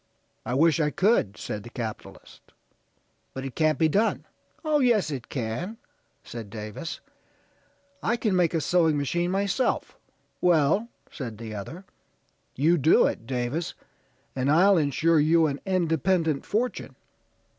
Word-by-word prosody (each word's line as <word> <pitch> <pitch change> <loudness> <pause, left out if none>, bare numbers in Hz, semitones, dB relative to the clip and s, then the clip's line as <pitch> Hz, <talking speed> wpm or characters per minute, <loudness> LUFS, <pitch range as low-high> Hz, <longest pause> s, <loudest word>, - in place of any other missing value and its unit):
'I 125 - -1
wish 165 +3 +4
I 150 -2 +2
could,' 190 - +1
said 105 - -5
the 120 - -11
capitalist, 115 -3 -8 0.8
'but 135 0 -5
it 135 - -6
can't 155 -1 +2
be 160 - +3
done,' 205 +8 +1 0.4
'Oh, 305 -1 +2
yes, 235 - +2
it 130 -4 -6
can,' 135 - -4 0.5
said 115 -3 -8
Davis. 110 - -7 1.0
'I 235 - 0
can 215 -5 0
make 175 -2 +2
a 160 - +1
sewing 165 -2 +2
machine 170 +5 -1
myself.' 200 +6 0 0.5
'Well,' 175 +5 +3 0.2
said 115 -7 -6
the 110 -1 -7
other; 150 - -7 0.7
'you 160 +5 +3
do 155 +4 +5
it, 115 - -3
Davis, 130 +6 -2 0.6
and 130 +1 0
I'll 185 +6 +5
insure 160 +1 +2
you 160 +2 +4
an 140 -2 -2
independent 165 -3 +1
fortune.' 240 +4 -2
160 Hz, 135 wpm, -26 LUFS, 130-180 Hz, 1.0 s, do